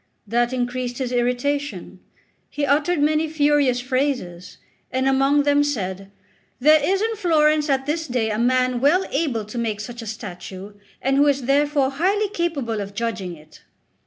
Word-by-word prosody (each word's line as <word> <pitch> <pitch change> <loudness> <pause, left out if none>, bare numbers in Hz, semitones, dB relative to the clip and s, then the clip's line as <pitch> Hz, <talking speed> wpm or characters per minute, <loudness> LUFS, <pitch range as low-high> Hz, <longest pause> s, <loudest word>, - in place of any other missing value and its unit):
That 240 +3 +1
increased 245 -1 -3
his 255 -2 -3
irritation; 250 +4 -2 0.5
he 295 - -2
uttered 295 +3 +2
many 310 +1 +1
furious 290 -4 +2
phrases, 250 -9 -2 0.3
and 260 +1 0
among 275 +2 +3
them 290 0 +3
said: 195 -9 -3 0.5
"There 305 +3 +5
is 390 +2 +1
in 450 0 -1
Florence 310 -5 +2
at 270 -1 +1
this 320 +2 -2
day 240 -4 -1
a 210 - -2
man 255 0 +1
well 350 +8 +3
able 270 -7 -1
to 215 +4 -8
make 220 -3 -2
such 235 +2 -7
a 225 - -8
statue, 200 -2 -8 0.3
and 270 +1 +2
who 290 +1 +5
is 280 -2 +1
therefore 280 +1 +2
highly 390 +8 0
capable 290 - -2
of 200 0 -7
judging 210 -6 -3
it." 155 -1 -18
265 Hz, 160 wpm, -22 LUFS, 235-295 Hz, 0.5 s, There